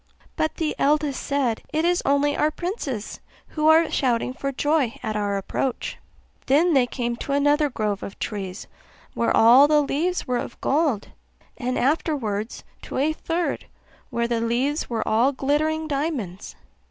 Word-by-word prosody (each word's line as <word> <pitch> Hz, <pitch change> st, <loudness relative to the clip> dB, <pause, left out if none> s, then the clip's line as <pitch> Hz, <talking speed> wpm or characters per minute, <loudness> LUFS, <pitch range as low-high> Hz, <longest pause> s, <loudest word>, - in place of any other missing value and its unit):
But 315 Hz, -, -1 dB
the 315 Hz, -2 st, -2 dB
eldest 295 Hz, -1 st, +1 dB
said, 265 Hz, -6 st, 0 dB
'It 315 Hz, +2 st, 0 dB
is 355 Hz, 0 st, +2 dB
only 285 Hz, +1 st, +2 dB
our 300 Hz, -, +2 dB
princes, 310 Hz, -, -4 dB, 0.3 s
who 305 Hz, -1 st, 0 dB
are 320 Hz, +1 st, +5 dB
shouting 250 Hz, -2 st, 0 dB
for 275 Hz, +1 st, -3 dB
joy 290 Hz, -3 st, 0 dB
at 215 Hz, -, -2 dB
our 205 Hz, -1 st, 0 dB
approach.' 240 Hz, +6 st, -3 dB, 0.5 s
Then 320 Hz, +6 st, +4 dB
they 260 Hz, -3 st, +4 dB
came 240 Hz, -1 st, -2 dB
to 275 Hz, -, -4 dB
another 290 Hz, +1 st, +3 dB
grove 210 Hz, -5 st, -2 dB
of 195 Hz, -, -7 dB
trees, 195 Hz, -3 st, -5 dB, 0.5 s
where 235 Hz, -, +1 dB
all 245 Hz, +6 st, +8 dB
the 300 Hz, 0 st, +4 dB
leaves 335 Hz, +6 st, -1 dB
were 250 Hz, -1 st, 0 dB
of -, -, -7 dB
gold; 280 Hz, -7 st, 0 dB, 0.5 s
and 250 Hz, 0 st, -2 dB
afterwards 245 Hz, -7 st, -1 dB, 0.2 s
to -, -, -6 dB
a 295 Hz, +4 st, +2 dB
third, 335 Hz, +2 st, -2 dB, 0.4 s
where 235 Hz, 0 st, -1 dB
the 235 Hz, -1 st, -1 dB
leaves 250 Hz, +6 st, 0 dB
were 230 Hz, -2 st, -2 dB
all 235 Hz, +5 st, +3 dB
glittering 310 Hz, +4 st, 0 dB
diamonds. 275 Hz, -, -3 dB
275 Hz, 155 wpm, -24 LUFS, 235-305 Hz, 0.5 s, all